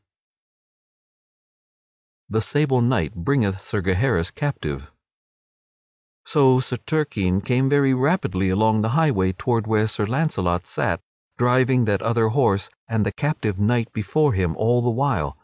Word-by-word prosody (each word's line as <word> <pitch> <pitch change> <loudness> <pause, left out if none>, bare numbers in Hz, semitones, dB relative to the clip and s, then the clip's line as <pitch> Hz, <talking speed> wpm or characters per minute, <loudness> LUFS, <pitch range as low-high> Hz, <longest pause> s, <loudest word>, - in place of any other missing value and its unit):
[Sidenote: - - -12
The 110 - +2
sable 135 +1 +1
knight 115 - 0
bringeth 100 0 -1
Sir 105 -1 -4
Gaheris 95 -1 0
captive] 75 - -4 1.4
So 130 -3 +4
Sir 125 -1 -3
Turquine 110 - -1
came 130 +5 0
very 140 -2 +3
rapidly 130 - 0
along 110 +3 +2
the 110 - 0
highway 110 -13 +2
toward 115 +3 -1
where 110 -1 +2
Sir 105 -1 -2
Launcelot 100 - -1
sat, - - -2 0.4
driving 125 0 +2
that 100 -3 0
other 115 -1 +1
horse 110 -6 +1 0.2
and 110 -2 0
the 100 - -1
captive 110 -5 -2
knight 115 +2 0
before 135 +7 +1
him 90 -4 -1
all 120 +3 +2
the 120 - 0
while. 120 - -1
115 Hz, 135 wpm, -22 LUFS, 95-130 Hz, 1.4 s, So